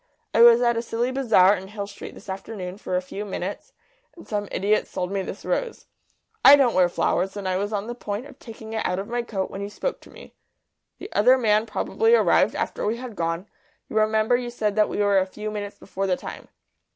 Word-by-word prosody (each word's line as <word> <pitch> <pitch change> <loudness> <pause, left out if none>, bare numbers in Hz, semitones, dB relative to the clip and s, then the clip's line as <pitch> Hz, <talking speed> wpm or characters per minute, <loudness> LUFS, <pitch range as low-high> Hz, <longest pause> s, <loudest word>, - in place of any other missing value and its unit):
I 230 - +4
was 235 +1 +8
at 235 -1 +2
a - - 0
silly 235 +2 -2
bazaar 220 -7 +4
in 190 0 -8
Hill 200 0 -5
Street 200 - -10
this - - -14
afternoon 190 -1 -6
for 185 - -3
a 180 - -2
few 195 +3 -6
minutes, 200 - -5 0.4
and 345 - -14
some 205 -1 -2
idiot 210 +2 +1
sold 180 +1 -4
me 195 -1 -1
this 190 - -7
rose. 480 -2 -2 0.6
I 280 - +11
don't 270 -4 +3
wear 180 -1 +4
flowers, 190 +3 0
and 200 -2 -4
I 185 0 0
was 205 +2 -2
on 205 -1 -2
the 240 - -5
point 215 0 -5
of 285 - -14
taking 220 -1 -10
it 220 - -1
out 180 - -1
of 195 +2 -4
my 240 +1 -1
coat 200 -5 -4
when 195 - -6
you 200 - -4
spoke - - -4
to - - -16
me. - - -14 0.6
The 395 - -10
other 250 +5 +5
man 215 -2 +2
probably 450 - +2
arrived - - +3
after - - -3
we 220 +3 0
had 245 -3 -8
gone; 165 +1 -2 0.4
you - - -8
remember 220 +2 +3
you 245 0 -2
said 215 -4 -2
that 215 -1 +3
we - - -4
were 205 -1 +3
a 190 - -1
few 210 +2 -6
minutes 205 -1 -6
before 195 0 -4
the 180 -1 +1
time." - - -9
210 Hz, 235 wpm, -24 LUFS, 195-235 Hz, 0.6 s, I